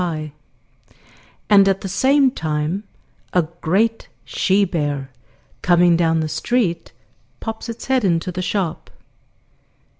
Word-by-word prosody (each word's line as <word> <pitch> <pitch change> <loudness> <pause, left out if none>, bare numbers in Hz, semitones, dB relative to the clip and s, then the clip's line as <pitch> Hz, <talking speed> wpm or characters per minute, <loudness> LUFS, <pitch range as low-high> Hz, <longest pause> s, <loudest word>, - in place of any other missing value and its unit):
gif)] 155 -4 -3 1.2
and 200 -2 +6
at 195 0 +1
the 195 - -4
same 265 +8 +3
time 160 - -2 0.5
a 180 - +3 0.2
great 220 +7 +1 0.2
she 200 +1 +2
bear, 145 -6 -3 0.5
coming 175 -1 +4
down 165 -1 +2
the 155 - -1
street, 170 +3 -1 0.5
pops 225 +1 -6
its 230 - -6
head 260 -2 +1
into 175 -1 +1
the 180 +1 -4
shop. 185 -3 -2
180 Hz, 120 wpm, -20 LUFS, 160-210 Hz, 1.2 s, and